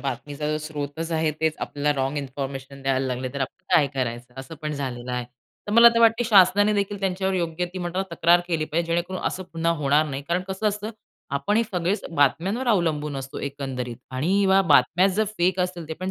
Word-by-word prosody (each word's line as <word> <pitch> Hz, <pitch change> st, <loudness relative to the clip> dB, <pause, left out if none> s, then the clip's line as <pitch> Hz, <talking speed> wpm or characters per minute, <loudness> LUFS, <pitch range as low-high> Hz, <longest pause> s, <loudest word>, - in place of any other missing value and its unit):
बातमीचा 145 Hz, +3 st, -3 dB
स्रोतच 155 Hz, +1 st, -5 dB
आहे, 160 Hz, -1 st, +1 dB
तेच 160 Hz, -1 st, +1 dB
आपल्याला 145 Hz, 0 st, -1 dB
रॉंग 135 Hz, +2 st, -1 dB
इन्फॉर्मेशन 135 Hz, 0 st, -6 dB
द्यायला 135 Hz, -1 st, 0 dB
लागले, 130 Hz, 0 st, -3 dB
तर 140 Hz, -, -4 dB
आपण 185 Hz, +8 st, -5 dB
काय 145 Hz, -, +5 dB
करायचं? 125 Hz, -1 st, -4 dB
असं 160 Hz, +5 st, -10 dB
पण 150 Hz, -, -2 dB
झालेलं 125 Hz, -3 st, -4 dB
आहे. 125 Hz, -1 st, -2 dB, 0.4 s
तर 205 Hz, -, -3 dB
मला 235 Hz, +1 st, +9 dB
तर 230 Hz, -, +3 dB
वाटते 230 Hz, +1 st, +4 dB
शासनाने 205 Hz, -1 st, +5 dB
देखील 200 Hz, 0 st, -1 dB
त्यांच्यावर 190 Hz, 0 st, -1 dB
योग्य 170 Hz, -1 st, -1 dB
ती 185 Hz, -, -5 dB
म्हणतो 175 Hz, +1 st, -3 dB
ना, -, -, +2 dB
तक्रार 170 Hz, +2 st, +4 dB
केली 165 Hz, -3 st, -1 dB
पाहिजे 165 Hz, +2 st, -1 dB
जेणेकरून 180 Hz, +2 st, -2 dB
असं 185 Hz, -, -2 dB
पुन्हा 165 Hz, 0 st, +1 dB
होणार 145 Hz, +2 st, +3 dB
नाही. 140 Hz, -1 st, -5 dB
कारण 180 Hz, +2 st, 0 dB
कसं 190 Hz, +3 st, 0 dB
असतं, 210 Hz, +2 st, -4 dB, 0.4 s
आपण 140 Hz, +10 st, 0 dB
हे 230 Hz, -, +4 dB
सगळेच 190 Hz, -1 st, -2 dB
बातम्यांवर 175 Hz, -, +1 dB
अवलंबून 155 Hz, -8 st, +1 dB
असतो 135 Hz, 0 st, -6 dB
एकंदरीत. 135 Hz, -4 st, -5 dB
आणि 175 Hz, +10 st, +1 dB
व्या 190 Hz, 0 st, +5 dB
बातम्या 170 Hz, +3 st, +4 dB
जर 205 Hz, +3 st, +1 dB
फेक 180 Hz, +1 st, +2 dB
असतील, 180 Hz, -3 st, -3 dB
ते -, -, -3 dB
पण 185 Hz, +3 st, -4 dB
160 Hz, 200 wpm, -24 LUFS, 140-190 Hz, 0.4 s, मला